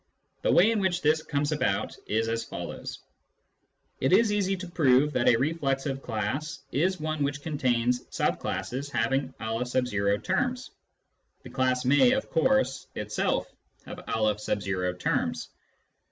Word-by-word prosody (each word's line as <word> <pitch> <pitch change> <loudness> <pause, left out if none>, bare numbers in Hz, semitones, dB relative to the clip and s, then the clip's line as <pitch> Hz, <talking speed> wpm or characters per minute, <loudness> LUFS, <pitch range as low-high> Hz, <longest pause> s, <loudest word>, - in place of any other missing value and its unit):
The - - +2
way 200 +6 +6
in 225 - +1
which 185 -2 0
this 155 +1 +3
comes 145 -1 -1
about 110 -9 0
is 110 +1 0
as 115 0 -1
follows: - - -7 0.5
— - - -46
It 130 - +2
is 215 +3 +5
easy 195 -2 +1
to 185 0 -7
prove 150 -4 +3
that 120 - +3
a - - +6
reflexive 135 0 -1
class 120 +8 -3
is 185 +6 +1
one 155 0 -3
which 145 0 -2
contains 125 -5 0
sub - - 0
classes 135 +3 -3
having 130 +2 0
N 110 -3 0
terms. 250 0 -1 0.7
(The - - -10
class 130 -1 +1
may, 145 - +5
of 265 +1 -2
course, 175 - +2
itself 105 0 -1 0.4
have - - -8
M 100 -4 -1
terms.) - - -1
135 Hz, 140 wpm, -27 LUFS, 115-160 Hz, 0.7 s, way